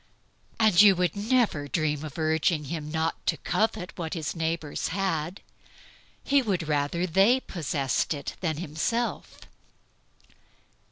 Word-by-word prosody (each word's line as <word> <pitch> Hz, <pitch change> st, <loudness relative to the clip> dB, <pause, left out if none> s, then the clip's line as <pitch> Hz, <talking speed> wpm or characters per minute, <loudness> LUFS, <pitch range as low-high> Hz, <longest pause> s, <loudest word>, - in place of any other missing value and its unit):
And 215 Hz, -4 st, +6 dB
you 200 Hz, -2 st, +7 dB
would 180 Hz, -2 st, 0 dB
never 205 Hz, -, +1 dB
dream 150 Hz, -1 st, -1 dB
of 155 Hz, -1 st, -8 dB
urging 160 Hz, 0 st, +1 dB
him 150 Hz, +1 st, -5 dB
not 160 Hz, +1 st, -2 dB
to -, -, +2 dB
covet 210 Hz, -4 st, -1 dB
what 165 Hz, +1 st, -3 dB
his 160 Hz, 0 st, -3 dB
neighbors 160 Hz, -2 st, -2 dB
had. 180 Hz, -2 st, -2 dB, 0.8 s
He 280 Hz, 0 st, +3 dB
would 190 Hz, -, -1 dB
rather 150 Hz, +4 st, 0 dB
they 195 Hz, +9 st, +4 dB
possessed 150 Hz, -, -2 dB
it 140 Hz, -, -6 dB
than 160 Hz, -5 st, -1 dB
himself. 175 Hz, +9 st, -3 dB
165 Hz, 125 wpm, -27 LUFS, 155-195 Hz, 0.8 s, you